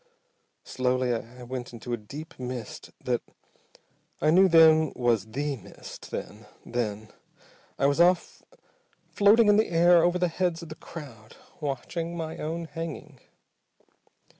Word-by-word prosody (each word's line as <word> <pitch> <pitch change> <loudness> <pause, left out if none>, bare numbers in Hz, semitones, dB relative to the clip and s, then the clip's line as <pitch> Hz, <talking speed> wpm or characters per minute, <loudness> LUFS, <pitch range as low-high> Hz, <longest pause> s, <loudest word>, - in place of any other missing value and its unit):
Slowly 125 -1 0
I 120 +2 -6
went 125 0 -6
into 120 +1 -6
a - - 0
deep 145 +11 -10
mist 125 -3 -6
that - - 0 1.0
I 155 - +3
knew 190 +3 +6
then 160 -2 +6
was 115 -4 +1
the 140 +5 -3
mist, 105 - -12
then 105 +1 -7 0.2
then 110 -3 -3 0.7
I - - +1
was 140 +4 +3
off 175 0 +2 0.7
floating 210 +2 +5
in 205 0 +6
the 220 - +2
air 170 0 +5
over 175 +1 +2
the 180 0 +1
heads 170 0 -1
of 165 - -10
the 155 - -7
crowd, 125 -11 -11 0.2
watching 165 +4 -4
my 160 -1 -5
own 165 +2 -3
hanging! 160 -4 -7
150 Hz, 140 wpm, -27 LUFS, 120-170 Hz, 1.0 s, knew